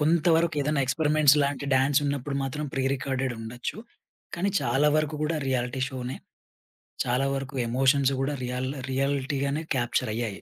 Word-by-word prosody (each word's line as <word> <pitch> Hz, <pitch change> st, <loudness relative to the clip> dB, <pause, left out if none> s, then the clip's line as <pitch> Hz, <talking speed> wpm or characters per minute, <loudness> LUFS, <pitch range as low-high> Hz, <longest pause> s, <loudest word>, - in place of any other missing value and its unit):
కొంత 160 Hz, +2 st, +2 dB
వరకు 165 Hz, 0 st, +1 dB
ఏదన్న 150 Hz, 0 st, +1 dB
ఎక్స్పెరిమెంట్స్ 150 Hz, 0 st, +4 dB
లాంటి 140 Hz, 0 st, -1 dB
డాన్స్ 135 Hz, +2 st, +3 dB
ఉన్నప్పుడు 140 Hz, 0 st, -2 dB
మాత్రం 135 Hz, +3 st, -3 dB
ప్రి 135 Hz, -, 0 dB
రికార్డెడ్ 130 Hz, -1 st, -2 dB
ఉండొచ్చు. 120 Hz, +7 st, -5 dB, 0.6 s
కానీ, 195 Hz, +3 st, 0 dB
చాలా 135 Hz, +4 st, +2 dB
వరకు 155 Hz, -1 st, 0 dB
కూడా 155 Hz, +1 st, 0 dB
రియాలిటీ 125 Hz, 0 st, -1 dB
షో‌నే. 130 Hz, -1 st, -5 dB, 0.9 s
చాలా 125 Hz, +2 st, +1 dB
వరకు 135 Hz, 0 st, -5 dB
ఎమోషన్స్ 135 Hz, +3 st, +3 dB
కూడా 140 Hz, +2 st, 0 dB
రియల్ 125 Hz, +1 st, -2 dB, 0.2 s
రియాలిటీ‌గానే 140 Hz, +2 st, -1 dB
క్యాప్చర్ 120 Hz, -2 st, 0 dB
అయ్యాయి. 110 Hz, -4 st, -3 dB
135 Hz, 145 wpm, -27 LUFS, 130-150 Hz, 0.9 s, ఎక్స్పెరిమెంట్స్